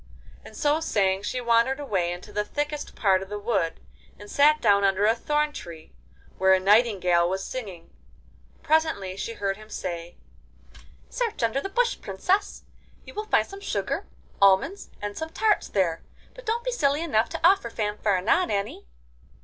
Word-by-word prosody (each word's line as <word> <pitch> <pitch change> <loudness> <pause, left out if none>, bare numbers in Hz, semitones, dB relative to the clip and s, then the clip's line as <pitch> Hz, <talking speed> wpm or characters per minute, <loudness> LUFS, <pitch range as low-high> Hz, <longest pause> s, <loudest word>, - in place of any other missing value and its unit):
And - - -12
so 295 +1 +2
saying 195 -11 +1
she 250 +5 -3
wandered 235 +3 +2
away 190 -11 -1
into 175 +1 -8
the 210 - 0
thickest 295 +6 -4
part 190 -3 +3
of 190 - -8
the 210 - -4
wood, 205 -6 -1 0.4
and 205 - -12
sat 300 +2 +5
down 200 -5 +4
under 195 +1 +2
a 220 - +5
thorn 295 +5 0
tree, 165 - -10 0.5
where 190 0 +5
a - - +1
nightingale 190 -4 +3
was 190 +1 -3
singing. 200 -10 -7 0.7
Presently 310 -13 +1
she 230 +4 -4
heard 195 -3 -2
him 215 0 -14
say: 175 -4 -5 0.9
'Search 470 - -3
under 230 +4 +1
the 390 - -5
bush 475 +4 0
Princess; 365 - -1 0.4
you - - -11
will 425 0 -4
find - - +3
some 395 0 -10
sugar, - - -3 0.3
almonds, 200 - +3
and 205 0 -4
some 320 0 -5
tarts 425 +5 +1
there 170 -5 0 0.3
But - - -13
don't 465 +2 0
be - - 0
silly 295 - +1
enough 230 -9 +1
to 330 - +3
offer 375 -10 +3
Fanfaronade 210 - 0
any. 200 - -3
215 Hz, 165 wpm, -25 LUFS, 195-300 Hz, 0.9 s, sat